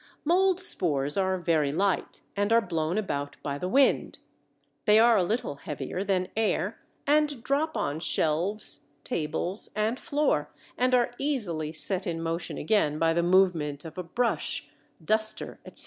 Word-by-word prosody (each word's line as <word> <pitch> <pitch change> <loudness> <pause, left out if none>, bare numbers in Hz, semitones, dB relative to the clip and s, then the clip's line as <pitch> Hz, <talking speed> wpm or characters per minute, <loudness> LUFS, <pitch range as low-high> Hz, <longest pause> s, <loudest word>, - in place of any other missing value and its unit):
Mold 370 +3 +3
spores 150 - 0
are 190 -1 +1
very 160 -5 +1
light 190 +4 -1
and 205 +1 0
are 230 - +6
blown 170 -4 -2
about 145 -9 -3
by 140 -1 -3
the 180 - -2
wind. 270 +5 +3 0.7
They 210 0 +6
are 230 +1 +6
a 200 - +4
little 175 - -2
heavier 145 +5 -5
than 185 -2 0
air, 215 -1 0 0.3
and 295 -4 +2
drop 305 +4 0
on 145 +2 -2
shelves, 170 +6 0 0.2
tables, 165 +5 -3
and 220 +4 0
floor, 300 -1 0 0.3
and 255 +1 +2
are 240 -1 +2
easily 190 - -2
set 185 +4 0
in 165 -1 -2
motion 165 +1 -3
again 180 -9 +1
by 165 +1 +2
the 170 - +2
movement 170 -5 +2
of 160 - -9
a - - -3
brush, 235 +7 -1 0.4
duster, 215 +3 +2
etc. - - -11
190 Hz, 155 wpm, -27 LUFS, 160-230 Hz, 0.7 s, are